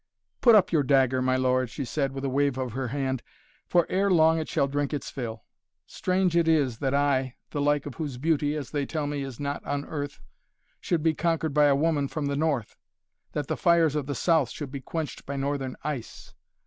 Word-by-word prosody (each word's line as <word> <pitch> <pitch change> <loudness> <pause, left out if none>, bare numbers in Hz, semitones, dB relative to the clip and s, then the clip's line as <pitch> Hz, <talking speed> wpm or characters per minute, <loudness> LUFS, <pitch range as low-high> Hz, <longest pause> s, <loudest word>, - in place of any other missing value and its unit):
"Put 235 -3 +7
up 200 -3 +4
your 160 -4 +3
dagger, 130 -2 +3
my 130 0 +2
lord," 130 -1 +1
she 135 +3 -5
said, 135 +1 -1
with 135 0 -5
a - - +1
wave 140 0 +1
of 130 -2 -3
her 130 +2 -3
hand. 130 -1 -2 0.5
"For, 175 -1 +3
ere 195 +2 +1
long, 160 -2 +5
it 155 - -4
shall 140 - +1
drink 145 +1 -1
its 145 - -5
fill. 115 -4 -5 0.4
Strange 185 - 0
it 170 -1 +3
is 140 -8 +2
that 135 -1 0
I 135 -3 +1 0.2
the 145 - -2
like 145 0 +2
of 145 - -6
whose 145 -5 -5
beauty, 150 +1 +1
as 145 -4 -5
they 145 -2 -1
tell 155 -2 -2
me, 145 -1 -2
is 135 -4 -6
not 145 0 -3
on 145 0 -3
earth 145 -2 -5 0.6
should 165 -3 -1
be 160 -1 +3
conquered 165 -2 0
by 150 0 +5
a 140 -1 +5
woman 145 -1 +1
from 150 +1 -3
the 140 0 -1
North 140 -7 -1 0.6
that 150 - -2
the - - -2
fires 170 -4 +3
of 145 -3 -2
the 145 - -2
South 160 -8 +2
should 145 -4 -6
be 140 -1 -6
quenched 155 +2 -5
by 140 - -3
Northern 135 -1 -2
ice. 145 -6 -6
145 Hz, 220 wpm, -27 LUFS, 135-155 Hz, 0.6 s, Put